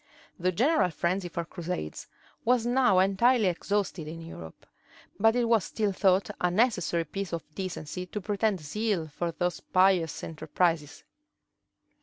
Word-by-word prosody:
The 180 +1 +1
general 250 - +3
frenzy 175 +3 -1
for 170 0 -4
crusades 170 - -5 0.4
was 240 -1 +2
now 245 -5 +3
entirely 205 +5 +4
exhausted 185 -2 -1
in 165 +2 -7
Europe; 85 - -10 0.5
but 225 +2 +4
it 245 - +2
was 230 -4 +3
still 210 +2 -1
thought 190 0 +2
a 180 - +3
necessary 180 -5 +1
piece 195 +4 -5
of 165 - -3
decency 180 -1 -5
to 210 - -4
pretend 205 -1 0
zeal 180 +1 -2
for 170 +3 -3
those 175 +1 -2
pious 185 -4 +2
enterprises. 165 -1 -1
185 Hz, 140 wpm, -28 LUFS, 170-210 Hz, 0.5 s, entirely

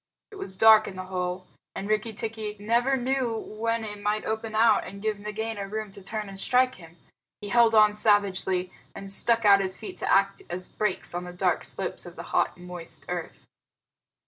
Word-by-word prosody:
It 410 - -11
was 190 - -6
dark 220 0 +7
in 190 - -7
the 185 - -5
hole; 185 0 -4 0.3
and 195 - -5
Rikki 215 +1 0
tikki 220 -1 -4
never 240 +6 +2
knew 255 -2 -1
when 230 +1 -3
it 210 -1 -7
might 210 +1 -1
open 220 0 -3
out 220 -1 +4
and 200 - -9
give 215 0 -2
Nagaina 210 0 -4
room 215 0 -5
to 200 - -11
turn 215 +2 -4
and 195 0 -6
strike 255 -2 +2
at 165 - -11
him. 170 - -24 0.4
He 205 - -7
held 235 0 +4
on 215 -1 +6
savagely, 195 -3 +2 0.2
and 195 0 -7
stuck 230 +3 +2
out 200 -1 +7
his 190 -1 -2
feet 215 - -8
to - - -1
act 195 0 +3
as 180 +1 -5
brakes 210 -5 -1
on 175 +1 -4
the 180 - -8
dark 180 - 0
slope - - -1
of - - -11
the - - -7
hot, - - +1
moist 180 -1 -6
earth. - - -6
210 Hz, 200 wpm, -26 LUFS, 195-225 Hz, 0.4 s, dark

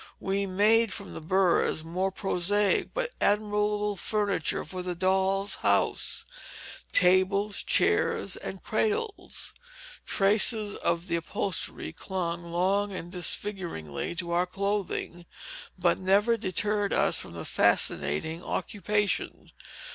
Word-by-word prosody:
We 195 +1 -1
made 210 +3 +3
from 200 +1 -7 0.2
burs 185 -4 +2
more 180 +4 -1
prosaic 195 +1 +1
but - - -2
admirable 210 0 +1
furniture 200 -4 -1
for 185 +3 -6
the 180 -1 -4
dolls' 190 +2 +1
house, - - +1 0.7
tables, 190 +3 +3
chairs, - - +2
and - - -7
cradles: 440 -1 -1 0.5
Traces 205 +1 +3
of 170 0 -1
the 170 -2 -1
upholstery 165 +2 -2
clung 170 -2 -4
long 195 +4 +1
and 175 -2 -7
disfiguringly 175 - -3
to 170 -2 -3
our 175 +1 +1
clothing, 195 -3 -3 0.5
but 175 -1 +2
never 200 +5 +3
deterred 205 0 -1
us - - +3
from - - -8
the - - -7
fascinating 160 - +1
occupation. 205 +1 -2
195 Hz, 110 wpm, -28 LUFS, 175-205 Hz, 0.7 s, made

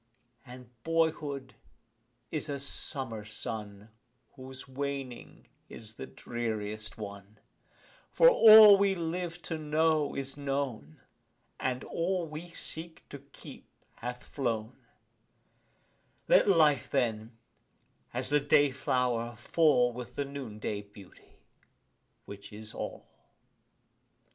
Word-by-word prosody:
And 125 -1 -12
boyhood 155 -4 -1 0.8
is 155 0 -2
a 140 - -2
summer 130 -4 -2
sun 105 -1 -7 0.4
Whose 130 -1 -9
waning 135 -2 -6 0.2
is 110 -1 -7
the - - -7
dreariest 110 -2 -5
one 100 0 -9 0.7
For - - +5
all 215 - +10
we 200 -1 +3
live 170 0 -4
to 160 -2 -4
know 155 -1 +1
is 135 0 -4
known, 135 - -4 0.6
And 130 -1 -2
all 175 +1 -1
we 155 +3 -8
seek 165 0 -7
to 140 - -8
keep 140 +1 -14 0.3
hath 125 +1 -6
flown 115 -3 -4 1.4
Let - - +5
life, 150 - +4
then, 115 -1 -1 0.7
as 125 +1 -3
the 145 0 +4
day 145 0 +4
flower, 125 -3 -1
fall 125 -1 +3
With 125 0 -8
the 145 - -1
noon 135 -6 -7
day 105 -1 -3
beauty 100 -2 -17 0.8
which 100 0 -10
is 105 0 -8
all. - - -6
130 Hz, 110 wpm, -30 LUFS, 115-155 Hz, 1.4 s, all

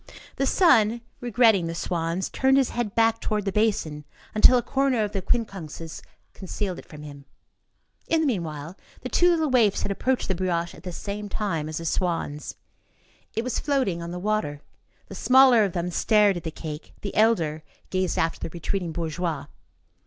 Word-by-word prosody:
The 275 - +1
son, 235 - +4 0.2
regretting 225 -6 +3
the 165 - -4
swans, 170 +1 -2
turned 265 0 +3
his 270 -2 +2
head 235 -4 -3
back 225 0 +3
toward 210 -1 -1
the 195 - 0
basin 190 -8 0 0.3
until 230 +4 +7
a 240 - 0
corner 270 -4 +1
of 205 - -3
the 195 - -2
quincunxes 185 -7 -3 0.3
concealed 190 -1 -4
it - - -14
from 150 -1 -11
him. 140 -2 -11 0.8
In 325 -1 +2
the - - +1
meanwhile, 165 - -3 0.3
the 255 - -5
two 355 +6 +4
little 320 -4 +1
waifs 225 -6 +3
had 200 - -2
approached 255 +6 0
the 190 - +1
brioche 175 -2 -1
at - - -13
the 180 - -6
same 205 +3 -5
time 165 -8 -2
as 155 - -4
the 165 - -5
swans. 165 -4 -2 0.8
It 225 - 0
was 255 - -2
floating 260 - 0
on 170 - -5
the 175 - -5
water. 180 -7 -2 0.5
The - - -10
smaller 255 -3 +6
of 195 -4 -1
them 175 0 -2
stared 210 +1 +3
at 175 - -6
the - - -1
cake, 155 -1 -8
the 200 - -5
elder 170 -9 +2 0.3
gazed 185 -1 0
after 165 0 0
the - - -5
retreating 170 +1 -3
bourgeois. 160 -3 -3
195 Hz, 180 wpm, -25 LUFS, 165-230 Hz, 0.8 s, until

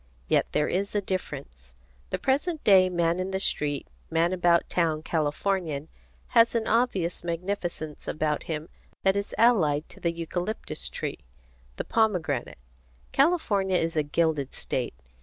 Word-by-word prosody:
Yet - - +3
there 150 0 +1
is 200 +3 -1
a 205 - +2
difference. 135 - -5 0.3
The - - -1
present 290 - 0
day 190 -2 +6
man 170 -1 +1
in 185 +1 -2
the 190 0 -1
street, 145 -6 0 0.2
man 165 +2 +2
about 175 -2 +3
town 160 -3 0
Californian 160 -1 -1 0.4
has 235 0 +5
an 225 -1 +1
obvious 200 -9 +1
magnificence 170 -3 -4
about 150 -1 0
him 155 0 -3 0.4
that 195 0 +4
is 200 0 -3
allied 175 -11 +4
to - - -12
the 170 - 0
eucalyptus 175 +5 -3
tree, - - -4 0.6
the - - -3
pomegranate. 180 - 0 0.5
California 210 - +2
is 165 -1 -1
a 155 - +3
gilded 150 -2 0
state. 120 - -3
175 Hz, 140 wpm, -27 LUFS, 155-200 Hz, 0.6 s, day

